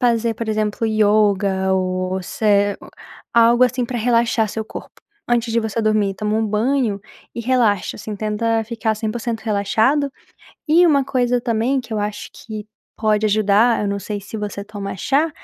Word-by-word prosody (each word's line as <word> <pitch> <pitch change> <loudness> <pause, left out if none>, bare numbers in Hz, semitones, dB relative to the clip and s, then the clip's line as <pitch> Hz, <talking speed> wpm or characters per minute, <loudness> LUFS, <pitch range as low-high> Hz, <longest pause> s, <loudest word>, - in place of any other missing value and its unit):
fazer 235 -2 +1
por 230 0 -5
exemplo 215 +1 -1
yoga 205 -3 +2
ou 185 0 -1
se 205 +1 +1 0.6
algo 235 +1 +5
assim 250 0 +2
pra 245 +1 -4
relaxar 230 -1 +2
seu 220 +2 -4
corpo, - - -10 0.3
antes 240 -1 +1
de 230 - +2
você 220 +1 -2
dormir, 215 -2 +1
toma 210 0 -1
um 225 - +1
banho 220 0 0 0.3
e - - -5
relaxa 235 -5 +1
assim 210 -2 -6
tenta 225 +2 -1
ficar 225 -1 -2
100% 225 +1 -3
relaxado 220 +7 +1 0.6
e 330 +4 +5
uma 285 -5 +4
coisa 245 -2 +1
também, 240 +3 0
que 230 -2 -10
eu 215 - -1
acho 210 0 -4
que 215 -1 -8 0.3
pode 215 -1 +1
ajudar, 215 +2 +3
eu 205 - -1
não 200 0 -2
sei 205 0 -5
se 210 +2 -8
você 205 -1 -5
toma 200 -2 -6
chá, 290 - +1
220 Hz, 165 wpm, -20 LUFS, 205-235 Hz, 0.6 s, algo